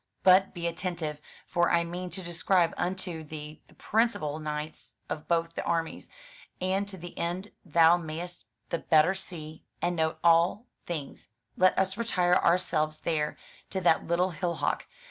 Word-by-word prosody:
But 190 +1 +6
be 170 -1 -4
attentive; 170 -3 -3 0.2
for 175 -1 +2
I 170 0 +3
mean 180 +2 -5
to 185 +2 -5
describe 175 0 +2
unto 180 -2 -3
thee 150 0 -8
the - - -21
principal 205 -10 0
knights 150 0 -5
of 155 - -5
both 165 -1 +1
the - - -3
armies; 165 -1 -2 0.5
and 190 +2 0
to 195 -1 -8
the 175 0 -9
end 180 +4 -2
thou 170 0 +5
mayest 170 +2 -6 0.3
the 170 - 0
better 160 +3 +4
see 160 -5 -8 0.2
and 175 0 0
note 160 0 +1
all 170 +6 +4 0.2
things, 150 -10 -5 0.3
let 185 0 +4
us 190 +1 +1
retire 185 -6 +2
ourselves 165 -4 +2
there 150 -2 -1 0.3
to 190 - -2
that 175 -3 +3
little 180 +2 +2
hillock. 170 0 -1
170 Hz, 155 wpm, -29 LUFS, 160-185 Hz, 0.5 s, But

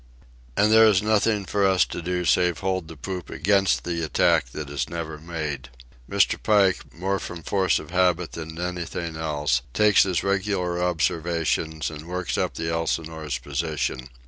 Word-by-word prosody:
And 105 +1 +4
there 110 0 +8
is 105 -2 +3
nothing 105 -1 +2
for 100 +1 0
us 95 -1 +4
to - - -6
do 90 +1 -2
save 90 -2 +2
hold 95 -3 -1
the 80 -1 -10
poop 90 +2 -6
against 95 +3 +2
the 85 -1 -2
attack 75 -5 +2
that 75 +3 -6
is 70 0 -3
never 80 -2 -5
made. 75 -6 -5 0.4
Mr. - - +2
Pike, 100 -3 +2
more 95 +3 -2
from 85 -1 -7
force 95 -3 +2
of 75 - -8
habit 90 -2 +2
than 80 0 -7
anything 85 -1 -4
else, 75 -5 0
takes 105 -1 +5
his 90 -4 +1
regular 95 -3 0
observations 80 -2 0
and 80 +1 -9
works 90 0 -3
up - - -1
the 80 0 -2
Elsinore's 80 -3 -2
position. 70 -1 -3
85 Hz, 165 wpm, -24 LUFS, 80-95 Hz, 0.4 s, there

